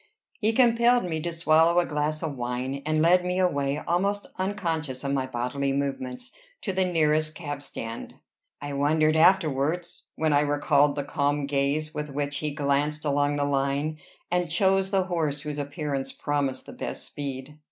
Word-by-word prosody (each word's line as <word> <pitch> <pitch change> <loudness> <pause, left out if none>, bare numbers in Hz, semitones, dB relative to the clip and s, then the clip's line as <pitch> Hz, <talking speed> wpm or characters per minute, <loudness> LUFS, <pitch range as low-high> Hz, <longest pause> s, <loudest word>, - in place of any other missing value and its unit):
He 220 0 +2
compelled 240 0 +4
me 160 -3 -2
to 170 +2 -2
swallow 165 +1 +3
a 175 - +2
glass 150 +1 -1
of 155 -3 -3
wine, 125 +2 -3
and 155 0 +2
led 180 +2 +5
me 180 0 -1
away, 145 -6 +1
almost 195 +6 0
unconscious 165 -9 -2
of 140 0 -1
my 130 -1 0
bodily 130 +3 -2
movements, 135 - -3 0.3
to 195 - -1
the 190 0 +2
nearest 155 -3 +1
cab 145 -4 -5
stand. 115 -4 -7 0.4
I 145 0 -5
wondered 155 +2 +2
afterwards, 165 -1 +2
when 155 -1 +1
I 145 - +5
recalled 145 0 +3
the 145 - -2
calm 145 +1 0
gaze 145 +2 0
with 150 0 -4
which 145 +1 -2
he 150 -2 -3
glanced 150 +1 0
along 145 0 +1
the 145 0 0
line, 140 +2 0 0.3
and 180 -1 +1
chose 190 +3 +2
the 195 -1 +2
horse 160 -5 -1
whose 150 -1 -5
appearance 140 -1 -3
promised 140 -3 -2
the - - -10
best - - -6
speed. 140 +1 -7
150 Hz, 170 wpm, -26 LUFS, 140-170 Hz, 0.4 s, led